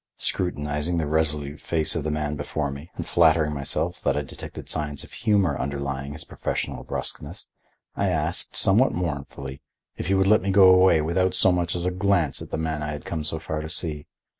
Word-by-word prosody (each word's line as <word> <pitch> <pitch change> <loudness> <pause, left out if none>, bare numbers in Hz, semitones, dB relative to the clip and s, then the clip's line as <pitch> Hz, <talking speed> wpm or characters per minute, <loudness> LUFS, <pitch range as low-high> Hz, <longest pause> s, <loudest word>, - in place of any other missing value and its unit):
Scrutinizing 75 -1 0
the 80 - 0
resolute 75 -1 0
face 80 -2 +2
of 80 - -1
the 75 - -1
man 75 -1 -1
before 75 0 -2
me 70 +5 -9
and - - -4
flattering 80 -2 +4
myself 70 -2 -2
that 70 0 +1
I 75 - 0
detected 65 - -9
signs 75 -2 -3
of - - -14
humor 100 -9 +2
underlying 70 0 -3
his 80 - -3
professional - - -3
bruskness, - - -4 0.5
I - - +1
asked, - - -1
somewhat 110 +8 +3
mournfully, 70 -5 -4 0.4
if - - -4
he 95 - +3
would 95 0 +3
let 105 +2 +5
me 95 - -2
go 95 -1 +7
away 90 -3 +5
without 90 +4 +1
so 95 - +5
much 90 -1 0
as 85 0 -2
a 90 - +1
glance 90 -6 +1
at - - -8
the - - -2
man 80 -1 -2
I 75 0 -3
had 75 - -7
come 80 -3 -3
so 75 +2 -1
far 80 -1 -4
to 80 - -6
see. 80 -3 -2
80 Hz, 205 wpm, -25 LUFS, 75-90 Hz, 0.5 s, go